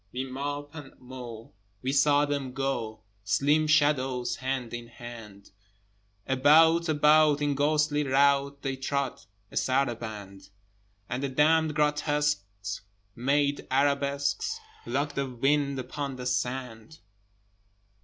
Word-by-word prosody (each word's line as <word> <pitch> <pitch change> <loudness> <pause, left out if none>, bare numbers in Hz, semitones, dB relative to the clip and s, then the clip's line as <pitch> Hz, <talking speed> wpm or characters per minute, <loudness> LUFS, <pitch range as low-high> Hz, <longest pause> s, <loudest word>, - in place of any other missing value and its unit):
With 130 +1 -4
mop 145 +2 -5
and 150 -4 -11
mow, 125 -3 -10 0.3
we 130 - 0
saw 145 +1 +4
them 140 -3 -3
go, 125 -5 -3 0.2
Slim 145 +9 +2
shadows 140 -5 +2
hand 130 -2 -3
in 120 0 -6
hand: 115 -4 -11 0.7
About, 160 +5 +5
about, 150 0 +4
in 145 -1 0
ghostly 150 +1 +1
rout 140 +1 +2
They 135 -1 -2
trod 135 0 -2 0.3
a - - -6
saraband: 110 -7 -2 0.6
And 120 +4 -3
the 140 - -1
damned 155 +3 +3
grotesques 150 -9 -1 0.3
made 140 +3 0
arabesques, 140 - 0 0.3
Like 145 +1 -1
the 140 -1 -2
wind 140 +3 +1
upon 135 +2 -4
the 125 -1 -7
sand! 125 +1 -3
140 Hz, 115 wpm, -28 LUFS, 125-145 Hz, 0.7 s, About